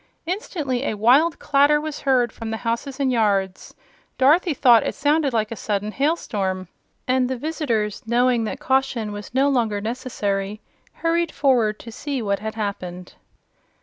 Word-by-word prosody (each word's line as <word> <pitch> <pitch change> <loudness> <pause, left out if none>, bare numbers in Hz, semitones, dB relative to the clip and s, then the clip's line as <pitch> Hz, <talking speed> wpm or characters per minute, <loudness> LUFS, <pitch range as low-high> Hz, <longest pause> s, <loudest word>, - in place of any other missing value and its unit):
Instantly 315 - -3
a 220 - -1
wild 275 +10 +4
clatter 290 +1 +3
was 305 -1 -5
heard 250 -4 +2
from 225 -1 -7
the 220 - -2
houses 245 +4 -2
and 270 -2 +1
yards. 200 -5 0 0.4
Dorothy 305 +4 +4
thought 240 -5 +6
it - - -3
sounded 290 0 +2
like 220 -2 -1
a - - -3
sudden 210 0 -2
hailstorm, 205 - -1 0.4
and 255 0 +2
the 260 - -2
visitors, 240 -8 -2
knowing 240 0 +2
that 265 - -4
caution 265 -6 0
was 205 +3 -8
no 270 +2 +4
longer 230 -7 +1
necessary, 210 -3 -3 0.5
hurried 335 0 +1
forward 240 -7 +2
to 230 - -10
see 280 +3 -4
what 200 -3 -1
had 220 +1 -5
happened. 185 -4 -5
245 Hz, 155 wpm, -22 LUFS, 215-280 Hz, 0.5 s, thought